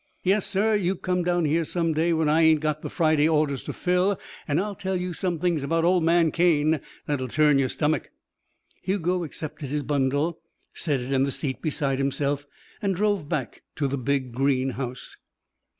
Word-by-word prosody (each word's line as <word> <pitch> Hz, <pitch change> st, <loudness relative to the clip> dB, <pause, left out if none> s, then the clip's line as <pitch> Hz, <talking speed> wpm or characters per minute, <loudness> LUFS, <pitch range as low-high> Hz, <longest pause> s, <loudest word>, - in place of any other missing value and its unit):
"Yes, 195 Hz, +2 st, +2 dB
sir. 210 Hz, +2 st, +1 dB
You 195 Hz, -2 st, +1 dB
come 180 Hz, 0 st, -1 dB
down 175 Hz, -1 st, +1 dB
here 160 Hz, +3 st, +2 dB
some 165 Hz, 0 st, 0 dB
day 165 Hz, +3 st, +1 dB
when 160 Hz, -1 st, +1 dB
I 155 Hz, +2 st, +4 dB
ain't 160 Hz, -1 st, +5 dB
got 155 Hz, 0 st, -1 dB
the -, -, -5 dB
Friday 155 Hz, -1 st, +2 dB
orders 150 Hz, -4 st, +1 dB
to -, -, -3 dB
fill 180 Hz, +2 st, +1 dB, 0.3 s
an' 145 Hz, -1 st, +1 dB
I'll 205 Hz, +3 st, -1 dB
tell 190 Hz, -1 st, -3 dB
you 180 Hz, 0 st, -3 dB
some 175 Hz, 0 st, -1 dB
things 170 Hz, -2 st, 0 dB
about 165 Hz, +4 st, 0 dB
old 180 Hz, -1 st, +3 dB
man 165 Hz, -1 st, +3 dB
Cane 160 Hz, -3 st, +2 dB, 0.2 s
that'll 140 Hz, -3 st, -2 dB
turn 150 Hz, +2 st, +3 dB
your 130 Hz, -2 st, +1 dB
stummick." 155 Hz, +3 st, -1 dB, 0.7 s
Hugo 180 Hz, -1 st, 0 dB
accepted 150 Hz, -2 st, -5 dB
his 150 Hz, +1 st, -2 dB
bundle, 145 Hz, +4 st, 0 dB, 0.3 s
set 145 Hz, -6 st, 0 dB
it 130 Hz, +3 st, -3 dB
in 135 Hz, -, +3 dB
the 140 Hz, -, 0 dB
seat 135 Hz, -1 st, -3 dB
beside 140 Hz, -4 st, -1 dB
himself, 140 Hz, +1 st, -1 dB, 0.3 s
and 195 Hz, -2 st, 0 dB
drove 200 Hz, -5 st, 0 dB
back 145 Hz, -8 st, -3 dB
to 145 Hz, -, 0 dB
the 135 Hz, 0 st, -2 dB
big, 130 Hz, 0 st, -1 dB
green 135 Hz, 0 st, +1 dB
house. 125 Hz, 0 st, -6 dB
155 Hz, 190 wpm, -25 LUFS, 140-175 Hz, 0.7 s, ain't